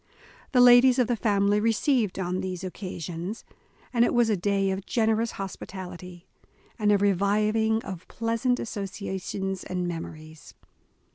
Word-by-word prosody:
The 250 - +5
ladies 245 +1 +7
of 250 - +4
the 240 +1 0
family 205 -1 +2
received 225 0 +1
on 185 0 -2
these 185 -1 -5
oc 185 - -5
casions, 180 +1 -6 0.5
and 235 -1 +4
it 240 - +1
was 235 -2 +3
a - - +3
day 195 +1 0
of 190 +1 -5
generous 225 -1 +1
hospitality, 180 -2 -8 0.5
and 210 -1 +3
a 205 - +5
reviving 210 +3 +1
of 185 -3 -8
pleasant 230 +2 -1
associations 195 -2 -4
and 180 -1 -3
memories. 160 -2 -8
200 Hz, 140 wpm, -26 LUFS, 185-225 Hz, 0.5 s, ladies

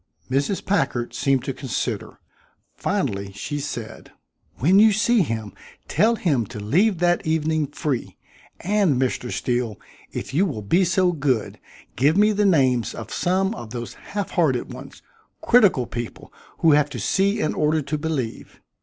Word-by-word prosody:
Mrs. 140 +9 0
Packard 125 -11 0
seemed 135 -2 +1
to 135 - -3
consider. 130 -4 -4 0.6
Finally 100 0 -2
she 145 +9 -4
said: 120 -6 -7 0.4
"When 180 - +4
you 220 +1 +7
see 230 +2 +3
him, 110 - -3 0.3
tell 220 +8 +3
him 140 - 0
to 105 - -8
leave 175 - +2
that 175 +1 +2
evening 155 -1 0
free. 145 -3 -3 0.4
And, 190 -8 +2
Mr. 125 -1 -1
Steele, 120 -4 -2 0.3
if - - -6
you 185 +7 +3
will 110 - -5
be 175 - +3
so 180 +1 +2
good, 135 -8 -1 0.4
give 145 +7 +3
me 210 +1 +5
the 210 -1 +2
names 130 -9 +2
of 110 - -7
some 190 +3 +1
of 120 - -8
those 120 0 -6
halfhearted 175 -10 -1
ones - - -11 0.4
critical 205 - +4
people 120 0 -7 0.3
who 165 - +6
have 150 0 +4
to - - -6
see 200 +2 +1
in 155 - 0
order 155 0 +1
to 145 +3 -3
believe. 150 -7 -4
150 Hz, 155 wpm, -23 LUFS, 125-190 Hz, 0.6 s, you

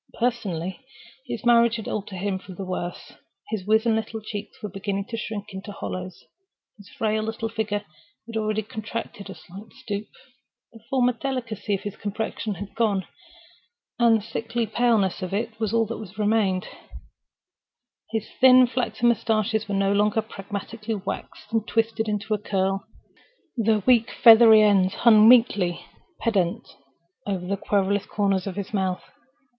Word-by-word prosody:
Personally, 195 -7 -2 0.5
his 235 -2 -5
marriage 235 -1 +5
had 220 -3 -6
altered 205 -2 -4
him 190 +1 -2
for 190 - -11
the 190 +2 -6
worse. 180 -1 -5 0.4
His 205 -3 -3
wizen 220 +1 +3
little 220 0 -3
cheeks 210 -1 -7
were - - -2
beginning 195 0 -3
to 230 - -4
shrink 215 -2 -5
into 190 +2 -7
hollows, 185 -2 -6 0.5
his 205 -2 -15
frail 215 -1 -1
little 225 +1 -3
figure 210 -2 -2 0.4
had 230 0 -9
already 215 0 0
contracted 215 -1 -6
a 195 - -7
slight 190 +6 -13
stoop. 205 -1 -5 0.7
The 225 - -13
former 250 -2 +2
delicacy 230 -5 -3
of 195 - -6
his 205 - -6
complexion 210 0 -3
had 200 +2 -8
gone—the 225 - -2
sickly 230 +2 -3
paleness 220 -4 +1
of 185 +1 -3
it 220 +1 -3
was 220 -3 -1
all 230 0 +2
that 215 -3 -8
remained. 210 -3 +1 1.4
His 220 -1 -3
thin 255 -1 +8
flaxen 240 -2 -1
mustaches 220 -2 +1
were 200 - -1
no 195 0 +2
longer 210 +2 +2
pragmatically 215 +2 -6
waxed 205 +3 -7
and 225 0 0
twisted 225 -1 0
into 210 +1 -1
a 210 - 0
curl: 195 -1 -1 0.7
their 220 -3 +1
weak 240 -2 +4
feathery 225 -2 +8
ends 195 -3 +3
hung 220 -2 +7
meekly 205 -8 +4 0.4
pendent 190 -7 0 0.6
over 190 -3 -2
the 200 +2 -1
querulous 200 0 0
corners 195 -2 0
of 190 - -4
his 200 +1 -5
mouth. 190 -2 -1
215 Hz, 150 wpm, -24 LUFS, 195-225 Hz, 1.4 s, thin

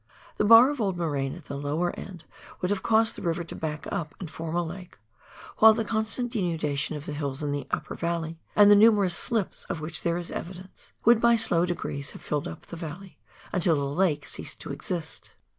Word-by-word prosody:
The - - +2
bar 230 +5 +8
of 290 -5 -4
old 195 -4 0
moraine 145 -5 -1
at 175 -4 -13
the - - -6
lower 150 +5 -1
end 180 -4 -9 0.4
would 180 +1 -1
have 200 -2 0
caused 225 0 +2
the - - -8
river 170 -1 -1
to 165 - -8
back 155 -1 -4
up, 155 -3 -4
and 170 -5 -7
form 165 0 -5
a 175 - +1
lake; 175 +2 -9 0.6
while 220 0 +8
the 225 -1 -1
con 220 0 0
stant 245 +3 -4
denudation 160 - -1
of 150 0 -7
the 150 - -5
hills 145 -1 -3
in 145 - -1
the 145 0 -3
upper - - -3
valley, 165 -1 -3 0.2
and 205 0 +7
the - - +9
numerous 205 -4 +5
slips 220 0 -2
of 165 - -4
which 155 +1 -3
there 170 0 0
is 175 -1 -4
evidence, 185 +2 -8
would 235 0 +6
by 235 0 +5
slow 175 -6 +2
degrees 140 -5 -3
have - - -12
filled 150 -1 -2
up 80 - -9
the - - -9
valley, 170 +4 -8 0.3
until 175 -3 +3
the 140 - -1
lake 150 -1 0
ceased - - -5
to - - -6
exist. 160 +3 -5
175 Hz, 220 wpm, -27 LUFS, 155-205 Hz, 0.6 s, the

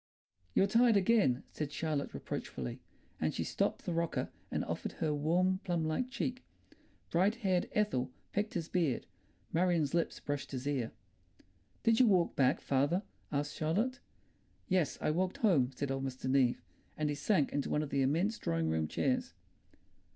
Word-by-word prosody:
"You're - - +5
tired 230 +2 +5
again," 190 - +3
said 150 -2 -4
Charlotte 150 -2 -2
reproachfully, 60 -3 -5 0.4
and - - 0
she - - -1
stopped - - -1
the 175 - -1
rocker 170 0 -1 0.2
and - - -1
offered - - -3
her 155 -2 -1
warm 180 +6 +2
plum 175 -4 0
like 155 +11 -1
cheek. 255 -1 -3 0.7
Bright 190 +6 +3
haired 185 -2 +2
Ethel 130 -12 +1 0.2
pecked 210 +1 -1
his 165 -2 -2
beard, 165 -9 0 0.5
Marion's 170 -4 +2
lips 170 -1 0
brushed 145 -1 -4
his 130 0 -4
ear. 130 -6 -1 0.9
"Did 225 -1 +4
you 255 - +7
walk 185 -5 +3
back, 130 -2 +3
father?" 145 +8 +1 0.3
asked 145 0 -1
Charlotte. 210 +12 0 0.7
"Yes, 185 -6 +1
I - - +2
walked 180 +3 0
home," 160 - +3
said 140 +1 -2
old 135 0 -2
Mr. 130 -1 -4
Neave, 130 -2 +3 0.3
and 155 - 0
he - - 0
sank 150 0 +1
into 140 -1 -1
one 150 - +1
of 145 - -6
the 140 - +2
immense 170 +11 +1
drawing 80 -1 0
room 80 -1 0
chairs. - - 0
160 Hz, 165 wpm, -33 LUFS, 140-190 Hz, 0.9 s, you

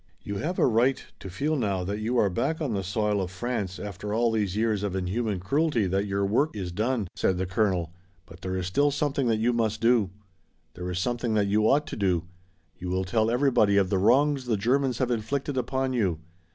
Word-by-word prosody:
"You 100 0 -4
have 175 - -3
a - - +4
right 125 +3 +2
to 95 - -8
feel 145 - -1
now 100 -8 -1
that 100 +3 -3
you 115 +4 -1
are 100 -4 +3
back 145 - -1
on 145 -8 -2
the 100 - -1
soil 105 +1 0
of 90 - -3
France 100 -1 -3
after 105 +1 -5
all 115 0 +2
these 105 -4 -1
years 110 -2 +1
of 100 -2 -2
inhuman 95 +2 -1
cruelty 135 - +1
that 95 +2 0
your 100 0 0
work 130 +9 +1
is 95 -4 -4
done," 110 +2 -1
said 95 - +1
the 95 - -1
colonel, 90 -3 0 0.3
"but 90 +2 -15
there 95 0 -3
is 90 - -2
still 145 +11 +2
something 145 -2 0
that 115 -1 +2
you 115 +3 +1
must 110 -2 0
do. 115 -4 +3 0.6
There 90 0 -6
is 90 - -3
something 120 +3 -1
that 105 -1 +3
you 105 +2 +2
ought 150 +2 +3
to 155 - -6
do. 90 -5 +1 0.6
You 90 - -5
will 95 +1 0
tell 110 +3 +1
everybody 120 -5 +3
of 95 -2 +2
the 95 - +2
wrongs 135 +6 +3
the 115 -3 0
Germans 125 +4 +1
have 125 -1 0
inflicted 130 +5 -2
upon 130 +1 -1
you. 95 -9 +1
110 Hz, 220 wpm, -27 LUFS, 95-125 Hz, 0.6 s, a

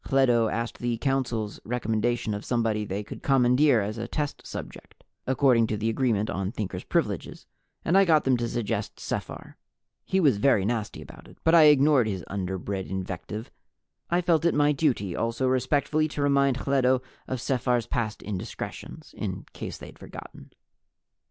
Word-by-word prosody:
Hledo 120 -4 +3
asked 115 +1 -3
the 120 -1 -1
Council's 120 -5 -1
recommendation 115 -1 -1
of 105 +1 -5
somebody 115 -3 0
they 100 +1 -3
could - - -9
commandeer 130 -1 +4
as 105 +3 -4
a 115 - -4
test 145 +2 -4
subject, - - -9 0.2
according 130 -3 +4
to 110 - -2
the 110 +2 0
Agreement 110 -4 +1
on 95 -1 -2
Thinkers' 105 -6 -4
Privileges, - - -2 0.4
and 170 - +2
I 195 - +7
got 160 -5 +4
them 130 -1 +3
to 120 0 -1
suggest 115 -3 -3
Sephar. - - -5 0.5
He 190 - 0
was 140 - +4
very 105 -3 +3
nasty 110 -1 -2
about - - -14
it, - - -16
but 160 - +3
I 165 -2 +8
ignored 145 -4 +5
his 95 -4 -3
underbred 95 0 -4
invective. 95 +3 -5 0.6
I 175 +1 +2
felt 170 -2 +2
it 170 - +2
my 145 0 +4
duty 130 - 0
also 115 +3 -1
respectfully 145 +4 +1
to 150 -1 -5
remind 140 -2 +3
Hledo 130 -2 +2 0.2
of 130 - -3
Sephar's 125 -2 0
past 110 -3 -3
indiscretions, 100 -3 -7
in - - -4
case - - -6
they'd - - -12
forgotten. - - -11
120 Hz, 165 wpm, -26 LUFS, 105-140 Hz, 0.6 s, I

